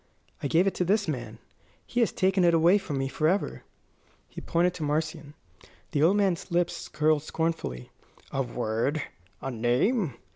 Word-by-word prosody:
I - - -1
gave 165 +6 +3
it 195 - +1
to - - +2
this 200 +3 +1
man. 120 -7 -4 0.5
He 245 - -2
has 230 - +3
taken 190 0 +2
it 170 -1 +5
away 170 +5 +5
from 150 -8 -4
me 135 0 0
forever." 160 +8 0 0.7
He - - -9
pointed 175 +1 +1
to 165 - -5
Marcion. 150 0 -2 0.6
The 145 - 0
old 180 +6 +5
man's 195 -4 0
lips 175 0 -1
curled 155 0 +2
scornfully. 155 - -3 0.4
"A 135 - 0
word, 120 +4 -1 0.4
a 135 - -3
name!" 125 - +1
160 Hz, 160 wpm, -27 LUFS, 135-180 Hz, 0.7 s, it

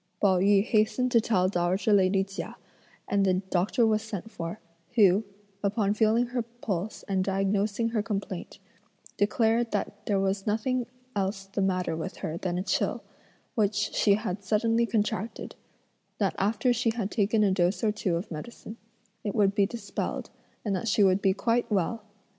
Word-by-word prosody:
Pao 190 -3 +4
yü 200 +1 +4
hastened 240 +3 +2
to 230 - +5
tell 185 -5 +2
dowager 185 +3 +1
lady 195 0 +4
Chia, 195 +1 -7 0.5
and 200 0 +2
the 190 -1 +3
doctor 190 +5 +1
was 215 -1 +2
sent 220 -1 -6
for, 170 +3 -5 0.4
who, 200 -2 +5 0.4
upon 205 0 +1
feeling 220 +3 +3
her 245 0 -1
pulse 220 -4 -4
and 190 -2 +1
diagnosing 200 +3 0
her 225 -2 0
complaint, 200 -4 -4 0.6
declared 225 +3 +2
that - - -3
there 200 -2 +2
was 195 +1 -1
nothing 240 +4 0 0.3
else 195 0 -1
the 195 +1 -3
matter 185 -3 0
with 160 - -5
her 160 - -4
than 175 0 -2
a 185 - -1
chill, - - -1 0.5
which 210 -2 +1 0.2
she 200 -2 +4
had 200 -2 -4
suddenly 225 +3 +2
contracted, 215 0 -2 0.6
that 195 -3 +1
after 220 +5 +2
she 240 0 +1
had 215 -4 -2
taken 215 0 +2
a 200 - +3
dose 185 +3 +1
or 215 - +3
two 195 -4 -1
of 175 +3 -4
medicine, 215 +6 -8 0.5
it 210 0 -3
would 200 -3 +3
be 200 -1 +3
dispelled, 235 +2 -4 0.3
and 200 -2 0
that 190 - -3
she 205 0 +3
would 190 0 +4
be 195 - +4
quite 230 +4 0
well. 210 +3 0
205 Hz, 170 wpm, -28 LUFS, 190-225 Hz, 0.6 s, to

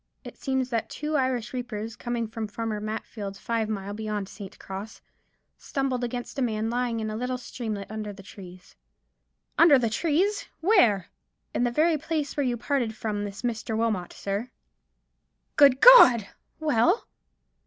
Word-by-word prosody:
It - - -10
seems 265 -2 -2
that 230 -2 -1
two 300 +1 -3
Irish 255 -4 0
reapers, 230 -3 -5
coming 240 -2 -3
from 220 0 -5
Farmer 215 0 -4
Matfield's, 210 -2 -5
five 230 -2 -2
mile 200 -1 -4
beyond 210 -2 -4
St. 195 -1 -10
Cross, 195 +3 -8 0.6
stumbled 265 -3 -2
against 245 +2 -4
a - - 0
man 225 -2 -1
lying 240 -1 -1
in 215 -1 -3
a - - -4
little 250 +2 -2
streamlet 220 -5 -5
under 215 -1 -5
the 195 -1 -12
trees——" 185 -2 -13 0.8
"Under 320 -4 +8
the 235 -3 0
trees! 345 - 0
Where?" 245 - +3 0.4
"In 245 - +1
the - - +2
very 310 +4 +2
place 310 -1 -3
where 285 - 0
you 245 -2 0
parted 240 -3 -1
from 210 -1 -3
this 200 +2 -8
Mr. 225 -2 -2
Wilmot, 215 -6 -1
sir." 200 +5 -4 1.1
"Good 275 -3 +6
God! 250 - +9 0.3
Well?" 315 - +2
230 Hz, 155 wpm, -26 LUFS, 215-260 Hz, 1.1 s, God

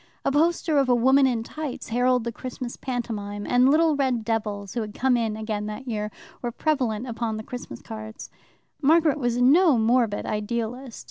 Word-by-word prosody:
A - - +2
poster 315 0 +2
of 270 -2 +1
a 245 - +5
woman 265 +3 +5
in 235 -3 -1
tights 300 0 -6
heralded 250 +1 +2
the 235 - -3
Christmas 250 0 -6
pantomime, 210 -5 -4
and 250 +1 +4
little 315 +1 +4
red 255 -5 0
devils, 210 -3 -2
who 235 - -1
had 210 -1 -6
come 260 -1 +2
in 225 -2 -1
again 215 -1 -3
that 215 +5 -7
year, 210 -3 -2 0.3
were 240 - -3
prevalent 250 -6 -1
upon 225 -2 -3
the 215 - -6
Christmas 245 +2 -8
cards. 220 -1 -8 0.5
Margaret 310 0 +4
was 240 -2 0
no 290 +3 +5
morbid 225 -1 +2
idealist. 235 +3 -3
240 Hz, 180 wpm, -25 LUFS, 220-265 Hz, 0.5 s, a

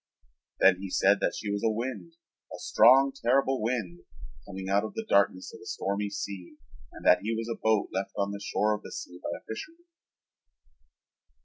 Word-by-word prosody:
Then 95 -1 +6
he 95 0 -6
said 100 +2 +3
that - - 0
she 105 - -4
was 100 0 -2
a 115 - +3
wind, 130 +9 -4 0.4
a - - -7
strong 135 +1 +5
terrible 135 0 +1
wind, 110 -7 -2 0.5
coming 95 -1 -7
out 100 +2 +2
of 110 - -6
the 225 - -4
darkness 100 - +2
of - - -11
a - - -12
stormy 100 +1 -2
sea 100 -3 -6 0.3
and - - -12
that - - +6
he 110 +3 -2
was 115 0 -3
a 115 - -5
boat 110 -2 +2
left 95 +1 -3
on 100 0 0
the 100 - -6
shore 105 +1 +1
of 105 - -4
the - - -11
sea 90 - -8
by - - -4
a - - -18
fisherman. 330 - -8
105 Hz, 195 wpm, -28 LUFS, 100-120 Hz, 0.5 s, Then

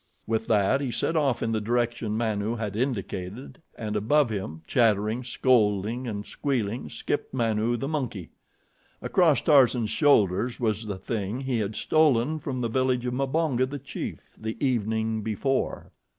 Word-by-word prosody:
With 110 0 -1
that 105 +5 +3
he 135 - -2
set 165 +7 -1
off 140 -6 +1
in 115 - 0
the 110 -1 0
direction 115 -1 -1
Manu 110 -1 -1
had 105 -3 -4
indicated 110 - -4 0.2
and 105 -2 -4
above 120 +5 +2
him, 90 -6 -5
chattering, 110 +1 +2
scolding 115 -1 +1
and 105 -2 -4
squealing, 120 -5 -2
skipped 145 - -3
Manu, 115 -1 +1
the 135 - -3
monkey. 125 - -3 0.7
Across 165 -6 +3
Tarzan's 125 -7 +4
shoulders 120 - +3
was 110 -2 -1
the 100 -2 -3
thing 110 +3 -3
he 130 -3 -1
had 105 0 -2
stolen 155 -1 +2
from 130 -3 -4
the 120 - 0
village 125 +1 0
of 125 - -1
Mbonga, 135 -1 +1
the 145 - -4
chief, 135 -1 -7
the 110 0 -4
evening 110 -4 0
before. 115 +6 -2
115 Hz, 150 wpm, -26 LUFS, 105-130 Hz, 0.7 s, Tarzan's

